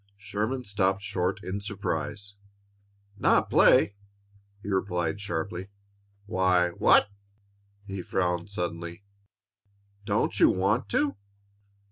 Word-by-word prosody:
Sherman 105 +5 -3
stopped 95 -2 0
short 95 -1 -2
in 95 +2 -4
surprise. 100 0 -4 0.9
"Not - - +3
play?" 100 - +5 0.7
he - - -8
repeated 95 -1 -1
sharply. 90 0 -4 0.6
"Why, 95 -3 +2
what 95 +3 +4 0.4
" 100 0 -38
He 100 -2 -5
frowned 90 0 -1
suddenly. 85 -1 -5 1.0
"Don't 100 -1 0
you - - +7
want 105 +4 +1
to?" 140 +2 0
100 Hz, 100 wpm, -27 LUFS, 90-100 Hz, 1.0 s, you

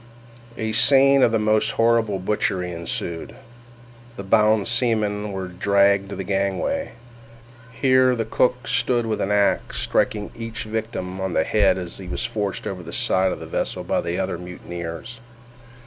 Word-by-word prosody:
A 110 0 -2
scene 135 +4 +5
of 115 - +4
the 115 - +2
most 110 0 +1
horrible 115 -3 +2
butchery 90 -2 -1
ensued. 85 0 -5 0.8
The 100 - -7
bound 105 0 +3
seamen 110 -4 0
were 95 -1 -4
dragged 100 +2 +2
to 100 - -5
the 95 - -4
gangway. 100 - -1 0.8
Here 130 +1 +3
the 115 -2 -2
cook 125 +2 0
stood 120 0 +1
with 110 -1 -2
an 100 - -1
axe, 100 -1 +1
striking 105 -1 0
each 115 0 -6
victim 110 -4 -4
on 95 -2 -2
the 80 - +2
head 100 0 +2
as 90 -1 -6
he 95 - -8
was 105 - -2
forced 105 -5 -3
over 95 -2 -4
the - - -9
side 95 0 +1
of - - -5
the - - -8
vessel - - -3
by - - 0
the 85 +1 -3
other 90 -2 -2
mutineers. 90 +5 -7
105 Hz, 165 wpm, -22 LUFS, 95-115 Hz, 0.8 s, scene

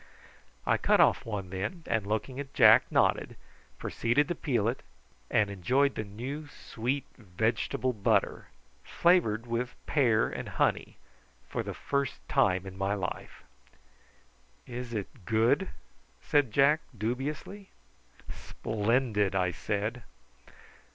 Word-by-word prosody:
I - - +3
cut - - +3
off - - +4
one 100 -4 -4
then, 100 - -4
and 110 -3 -1
looking 110 +5 -2
at 140 -1 -7
Jack 110 -3 +7
nodded, - - +2 0.4
proceeded 130 +8 0
to - - +1
peel 125 -10 0
it, 120 +3 -2 0.5
and 105 -1 +2
enjoyed 130 +9 +2
the 110 - -3
new 130 +9 -6
sweet 130 0 -4
vegetable 110 +5 -1
butter, 105 -3 +1 0.4
flavoured 165 -11 +2
with 120 +1 -3
pear 120 -7 +3
and - - -6
honey, - - 0 0.5
for - - -3
the - - -6
first 140 -2 -3
time 95 0 +2
in 95 0 -9
my 100 +1 0
life. 95 -3 -6 1.2
"Is 125 0 -6
it 110 0 -6
good?" 115 - +2 0.5
said 145 -5 +2
Jack, 140 +6 +4 0.2
dubiously. 140 - -4 0.6
"Splendid," 110 -2 -1
I 90 -2 +1
said. 105 +7 -3
115 Hz, 120 wpm, -29 LUFS, 105-135 Hz, 1.2 s, Jack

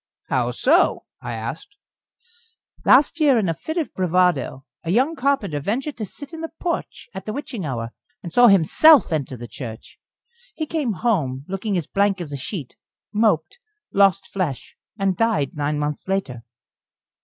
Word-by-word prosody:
"How - - +1
so?" - - +2 0.2
I - - -5
asked. 405 0 -6 1.1
"Last 285 +5 +5
year, 285 -5 +5
in 210 -4 +1
a 165 - +1
fit 315 - -6
of 325 - -2
bravado, 180 -7 +1 0.2
a 165 - -5
young 260 - +2
carpenter 255 - 0
ventured 255 - -2
to 215 -3 -4
sit 285 - -10
in 325 - -6
the 325 - -4
porch 345 -2 -3
at 190 +1 -8
the 215 - -2
witching 240 - -5
hour, 115 -3 -4 0.3
and 170 -2 -7
saw 245 +3 +7
himself 205 - +6
enter 135 -4 -2
the 120 +1 -8
church. 115 -3 -9 0.6
He 315 - -2
came 295 -7 -1
home, 155 - -1
looking 195 +1 -2
as 170 - -2
blank 200 +2 +1
as 155 -5 -6
a - - -3
sheet, 140 - -5 0.4
moped, 210 - +1 0.3
lost 195 -1 +4
flesh, 170 -10 -4 0.2
and 195 -2 +1
died 220 -9 +1
nine 150 -1 -1
months 150 +2 -3
later." 140 -12 -2
195 Hz, 165 wpm, -22 LUFS, 150-245 Hz, 1.1 s, saw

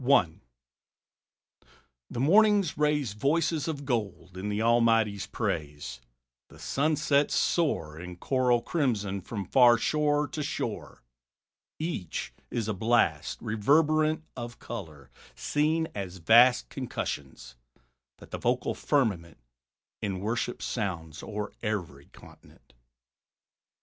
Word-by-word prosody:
I. 120 -11 +4 1.8
The 120 - -5
mornings 200 - +4
raise 150 -6 +1
Voices 155 +6 0
of 145 -3 -4
gold 100 -8 -3
in 95 +3 -4
the 105 0 -1
Almighty's 115 -3 +3
praise; 75 -6 -4 0.5
The - - -17
sunsets 145 0 +1
soar 80 - 0
In 90 +1 -8
choral 125 +4 +1
crimson 105 - -1
from 100 +1 -5
far 120 +3 +6
shore 150 +3 +1
to 150 - -4
shore: 145 - -4 0.7
Each 155 - -4 0.2
is 115 -3 -2
a 110 - 0
blast, 115 +5 +1
Reverberant, 155 +8 +2
of 120 +1 -7
color, 80 - -8 0.2
seen 155 +2 0
as 95 -2 -5
vast 115 - +5
Concussions, 65 -3 -5 0.6
that - - -15
the - - -4
vocal - - 0
firmament 100 - 0 0.6
In 95 -3 -2
worship 115 +4 -2
sounds 85 -8 -4
o'er 105 -1 -5
every 85 -10 -4
continent. - - -18
115 Hz, 110 wpm, -28 LUFS, 95-145 Hz, 1.8 s, far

